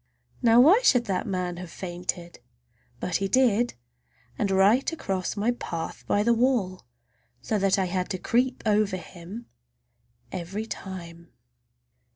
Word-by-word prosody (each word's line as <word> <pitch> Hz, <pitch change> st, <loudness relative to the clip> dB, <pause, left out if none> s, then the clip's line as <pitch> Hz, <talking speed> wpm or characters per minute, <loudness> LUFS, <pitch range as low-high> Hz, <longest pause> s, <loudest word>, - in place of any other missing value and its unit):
Now 235 Hz, -1 st, +6 dB
why 345 Hz, -, +7 dB
should 245 Hz, -, +4 dB
that 195 Hz, -4 st, -2 dB
man 180 Hz, -2 st, -2 dB
have 180 Hz, -1 st, -7 dB
fainted? 175 Hz, -1 st, -5 dB, 0.6 s
But 180 Hz, -, -1 dB
he 195 Hz, -, -1 dB
did, 240 Hz, +1 st, +2 dB, 0.6 s
and 205 Hz, -, -1 dB
right 200 Hz, -, +4 dB
across 195 Hz, -, -3 dB
my 215 Hz, +4 st, +2 dB
path 170 Hz, -9 st, -5 dB
by 205 Hz, -, +2 dB
the 235 Hz, +2 st, +4 dB
wall, 225 Hz, -, 0 dB, 0.6 s
so 215 Hz, -, 0 dB
that 195 Hz, 0 st, +2 dB
I 190 Hz, -, +1 dB
had 180 Hz, 0 st, -2 dB
to 190 Hz, -, -2 dB
creep 250 Hz, +7 st, 0 dB
over 210 Hz, -3 st, +2 dB
him 185 Hz, +6 st, -10 dB, 0.9 s
every 190 Hz, +4 st, -4 dB
time! 170 Hz, -5 st, -8 dB
195 Hz, 140 wpm, -26 LUFS, 180-235 Hz, 0.9 s, why